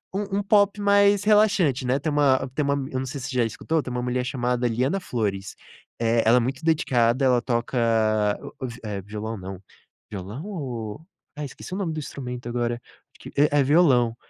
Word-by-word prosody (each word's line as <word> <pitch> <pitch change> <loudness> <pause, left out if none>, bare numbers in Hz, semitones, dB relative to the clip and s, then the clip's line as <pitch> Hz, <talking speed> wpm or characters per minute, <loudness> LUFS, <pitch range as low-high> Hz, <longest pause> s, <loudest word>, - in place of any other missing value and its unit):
um 200 0 -2
um - - -2
pop 200 0 +3
mais 200 0 +4
relaxante, 200 - +3
né. 130 +2 +1
Tem 155 +2 -2
uma 135 -2 +3
tem 150 - +1
uma 140 0 +1
m 135 -1 -4
eu 130 - -1
não 130 - -3
sei 140 +2 -5
se 135 +2 -5
já 125 - +3
escutou, 155 +7 -1
tem 125 - -6
uma 125 0 -2
mulher 125 +1 -1
chamada 125 -2 0
Liana 130 +11 0
Flores, 100 - -3 0.5
eh, 115 0 +2
ela 115 +3 +6
é - - +5
muito 130 +5 -3
dedicada, 130 -5 +2
ela 125 -2 +4
toca 120 +1 -2 0.6
o - - -9
o - - -2
vi 120 0 -9
eh, 100 -2 -4
violão 105 +3 -5
não. 95 0 -8 0.5
Violão 105 - -7
ou 130 - -5 0.4
ai, 150 - -4
esqueci 140 +6 -9
o - - -2
nome 190 -5 -2
do 155 - -3
instrumento 125 -4 -6
agora, 120 0 -1 0.4
que - - -10
é 145 0 +4
é - - +5
violão, 130 -6 +4
130 Hz, 205 wpm, -24 LUFS, 120-155 Hz, 0.6 s, ela